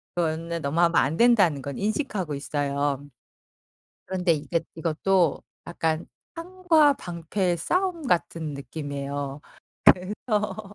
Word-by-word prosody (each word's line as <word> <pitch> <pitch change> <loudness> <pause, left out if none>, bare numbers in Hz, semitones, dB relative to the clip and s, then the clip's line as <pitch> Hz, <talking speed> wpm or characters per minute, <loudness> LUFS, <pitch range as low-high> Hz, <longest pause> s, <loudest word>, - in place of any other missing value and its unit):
그거는 165 0 -1
너무 145 +4 -1
하면 170 -2 +3
안 150 +3 +2
된다는 200 - +4
건 140 0 -6
인식하고 205 - -2
있어요. 140 -1 -2 1.0
그런데 180 -2 +1
이게 160 +2 -1
이것도 165 +1 +1 0.3
약간 165 -1 -1 0.3
창과 330 -4 +3
방패의 175 - -2
싸움 350 - -1
같은 165 -4 0
느낌이에요. 140 -1 -5 0.6
그래서 210 0 -3
170 Hz, 255 characters per minute, -25 LUFS, 145-210 Hz, 1.0 s, 된다는